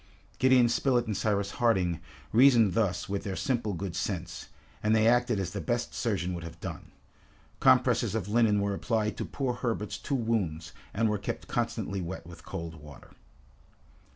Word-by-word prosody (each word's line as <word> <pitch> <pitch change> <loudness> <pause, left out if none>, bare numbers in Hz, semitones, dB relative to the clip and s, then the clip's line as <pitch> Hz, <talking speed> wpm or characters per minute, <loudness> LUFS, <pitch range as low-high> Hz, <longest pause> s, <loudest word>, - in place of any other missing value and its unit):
Gideon 130 -2 +5
Spilett 120 0 +2
and 105 - -2
Cyrus 100 0 0
Harding 95 -8 +2 0.3
reasoned 115 -5 +6
thus 95 -3 0
with 100 0 -3
their 95 -2 -3
simple 120 -6 -1
good 85 0 -4
sense, 90 -3 -4 0.3
and 110 +1 +3
they 110 0 +4
acted 120 -2 +3
as 95 - -2
the - - -4
best - - -2
surgeon 90 +2 -1
would 85 -1 -5
have 85 0 -9
done. - - -7 0.7
Compresses 105 - +4
of 105 -4 -2
linen 105 -2 +3
were 100 0 0
applied 110 +1 -1
to - - -3
poor 130 -3 -2
Herbert's 115 -4 -3
two 140 - -2
wounds, 100 -10 -1 0.2
and 115 +2 +1
were 105 -1 0
kept 100 - -5
constantly 100 -1 -2
wet 85 +1 -6
with 85 -1 -12
cold 80 -1 -6
water. 75 -2 -13
105 Hz, 170 wpm, -29 LUFS, 90-115 Hz, 0.7 s, reasoned